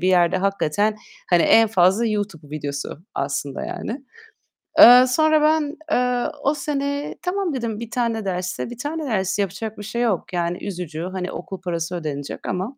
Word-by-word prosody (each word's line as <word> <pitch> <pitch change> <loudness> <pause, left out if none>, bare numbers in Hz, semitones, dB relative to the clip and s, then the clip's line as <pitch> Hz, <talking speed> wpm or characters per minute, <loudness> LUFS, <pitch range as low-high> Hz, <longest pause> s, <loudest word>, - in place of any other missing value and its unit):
bir 185 - +1
yerde 175 -1 +4
hakikaten 200 +2 0 0.3
hani 175 -2 +5
en 225 -1 +5
fazla 190 +3 +3
YouTube 200 -8 -3
videosu 145 -1 -5 0.2
aslında 140 0 -3
yani. 260 +5 -5 0.8
Eee, 250 -3 +10
sonra 310 +3 +3
ben, 305 -1 +2 0.2
eee, 250 0 +1 0.2
o 280 - +3
sene 285 0 -3
"Tamam." 365 -3 -1
dedim 230 -4 -3
1 235 -1 -7
tane 230 -3 -1
dersse 180 +2 -3
1 240 - -8
tane 300 +4 -4
ders 190 -5 -1
yapacak 205 +3 -3
bir 205 - -7
şey 235 +3 -3
yok. 200 -5 -1
Yani, 175 +1 -2
üzücü. 170 -4 -5
Hani 185 -1 -4
okul 190 +2 -7
parası 175 -1 -3
ödenecek 145 -4 -5
ama. 195 +9 -3
205 Hz, 165 wpm, -22 LUFS, 180-250 Hz, 0.8 s, Eee